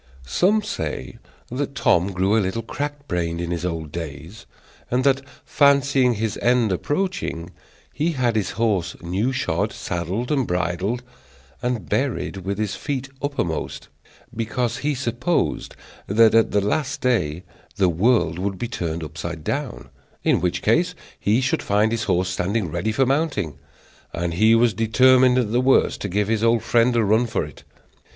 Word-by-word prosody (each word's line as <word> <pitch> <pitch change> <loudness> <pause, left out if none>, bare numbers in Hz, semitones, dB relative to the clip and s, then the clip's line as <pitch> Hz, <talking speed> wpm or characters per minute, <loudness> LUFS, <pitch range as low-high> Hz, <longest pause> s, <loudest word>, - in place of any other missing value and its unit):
Some 200 - +2
say 75 - -5 0.3
that 140 +2 -3
Tom 95 - +2
grew 95 +3 +1
a 110 - +4
little 100 +4 -2
crack 145 +4 -5
brained 85 -2 -2
in 85 0 -3
his 85 -1 -3
old 80 -4 -3
days, 80 +4 -8 0.4
and 125 +1 +1
that, 135 0 +3 0.2
fancying 140 -3 +3
his 110 0 -2
end 120 -3 +3
approaching, 95 - -2 0.4
he 165 +3 0
had 125 -5 0
his 105 -3 0
horse 100 -6 0
new 95 +9 0
shod, 130 - -1
saddled, 90 - -3
and 135 -5 +1
bridled, 90 +7 -1 0.6
and 120 -7 -2
buried 120 -2 -1
with 95 +1 -4
his 105 -1 -1
feet 135 -2 -4
uppermost; 140 - -3 0.5
because 115 +1 -1
he 145 +2 -1
supposed 125 +6 -1 0.3
that 110 +2 +5
at 115 0 +4
the 105 - +2
last 145 +7 -1
day 90 -10 0 0.3
the 95 - +3
world 90 -2 +2
would 95 0 -2
be 120 - -3
turned 85 -8 -3
upside 80 +1 -6
down; 140 - -4 0.3
in - - +2
which 90 -1 -1
case 175 +11 +2 0.2
he 110 +5 +2
should 130 - 0
find 105 +2 +2
his 115 -1 -1
horse 90 +1 +1
standing 95 0 -1
ready 85 +7 -1
for 130 +5 +2
mounting, 135 - -1 0.5
and 85 0 -2
he 110 +6 +5
was 115 -1 +3
determined 125 +4 +4
at 115 -4 +1
the 120 +2 +2
worst 130 +1 +3
to 100 - -3
give 100 +2 0
his 110 0 0
old 115 -1 +3
friend 120 +1 +3
a 115 - +3
run 110 +4 +3
for - - -1
it. - - -13
110 Hz, 165 wpm, -22 LUFS, 90-130 Hz, 0.6 s, that